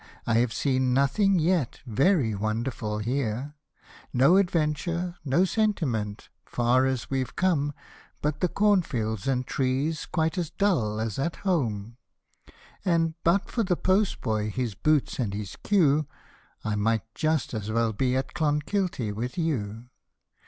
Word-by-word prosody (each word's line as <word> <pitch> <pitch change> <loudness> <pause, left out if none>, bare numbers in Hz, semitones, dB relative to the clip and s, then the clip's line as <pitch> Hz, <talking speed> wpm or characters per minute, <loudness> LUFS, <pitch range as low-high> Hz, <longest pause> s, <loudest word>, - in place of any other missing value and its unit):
I 115 -1 +3
have 120 -1 +1
seen 130 -2 +1
nothing 190 +9 +3
yet 165 -5 +1
very 135 - +2
wonderful 110 +2 -2
here; 125 +4 -2 0.6
No 135 +7 +5
adventure, 170 0 0
no 150 +6 +3
sentiment, 145 - -1
far 125 +2 +2
as 130 -1 -3
we've 130 -2 -2
come, 160 -6 +1 0.5
But 150 0 -1
the 180 - +2
corn 205 +1 +3
fields 110 - -3
and 130 -1 +1
trees 135 +5 -1
quite 160 +1 0
as 170 -4 -2
dull 120 - +1
as 110 0 -3
at 165 +5 -1
home; 115 - -1 0.9
And 165 -3 +2
but 175 +4 +2
for 235 - 0
the 185 -4 +1
post 190 +2 +1
boy, 110 -1 -1
his 120 0 -2
boots 150 +8 +1
and 105 -6 -1
his 100 -3 -5
queue, 155 -7 +2 0.6
I 105 - 0
m\^tjust 115 +8 0
as 110 -2 -4
well 115 0 +1
be 125 +4 0
at 130 -1 -3
Clonkilty 150 - 0
with 120 - -4
you 120 - -2
135 Hz, 140 wpm, -27 LUFS, 115-170 Hz, 0.9 s, No